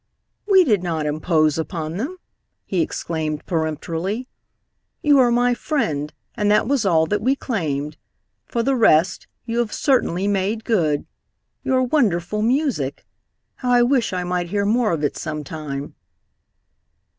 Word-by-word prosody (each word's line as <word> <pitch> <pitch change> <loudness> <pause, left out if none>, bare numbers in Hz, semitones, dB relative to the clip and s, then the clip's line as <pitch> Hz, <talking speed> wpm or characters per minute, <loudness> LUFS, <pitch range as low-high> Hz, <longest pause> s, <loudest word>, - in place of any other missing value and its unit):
"We 385 -3 +6
did 215 - +2
not 165 -4 -2
impose 155 0 +1
upon 160 -1 -4
them!" 290 - -4 0.5
he 185 -3 0
exclaimed 155 -2 -3
peremptorily. 165 - -2 0.8
"You 290 -2 +5
are 250 -2 +5
my 245 +1 +3
friend, 165 - -2 0.2
and 210 -3 0
that 210 +1 +3
was 260 -6 +1
all 160 -3 +4
that 205 +4 -1
we 260 +5 +2
claimed. 150 - -3 0.5
For 235 - -1
the 270 +2 +2
rest, 185 -6 +3 0.2
you 235 0 -2
have 235 -3 0
certainly 200 - +1
made 205 +2 0
good. 160 -10 +1 0.6
Your 260 -1 +2
wonderful 210 - +1
music! 240 - 0 0.5
How 250 - -3
I 240 0 +6
wish 250 -1 +2
I 180 -1 -2
might 180 -1 -2
hear 200 +1 0
more 225 +1 +2
of 160 -3 -2
it 145 - -1
some 155 -1 -4
time!" 145 -2 -6
195 Hz, 145 wpm, -21 LUFS, 160-240 Hz, 0.8 s, We